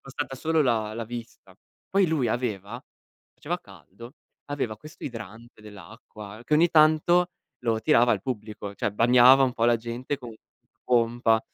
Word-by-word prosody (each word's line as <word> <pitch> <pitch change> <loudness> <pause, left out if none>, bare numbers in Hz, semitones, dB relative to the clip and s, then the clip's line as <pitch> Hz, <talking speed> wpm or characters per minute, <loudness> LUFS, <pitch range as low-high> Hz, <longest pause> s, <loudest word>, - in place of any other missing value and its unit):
bastata 135 0 -6
solo 160 +3 +1
la 110 -5 0
la 115 +1 -4
vista. 115 0 -10 0.3
Poi 195 -1 +2
lui 150 -7 0
aveva 115 -1 -3 0.5
faceva - - -4
caldo, 115 +6 -15 0.3
aveva 135 -7 -4
questo 155 +7 -15
idrante 115 -1 -9
dell'acqua 105 +1 -12
che 150 - +1
ogni 165 +3 +4
tanto 160 +3 +4 0.3
lo 115 -2 0
tirava 120 +2 +4
al 100 -4 -2
pubblico, 105 -4 -6
cioè 105 - -2
bagnava 125 +4 +6
un 125 -2 +1
po' 115 - 0
la 120 0 +4
gente 120 +4 -5
con 125 -4 -10 0.5
pompa, 115 -2 +2
120 Hz, 150 wpm, -25 LUFS, 110-135 Hz, 0.5 s, bagnava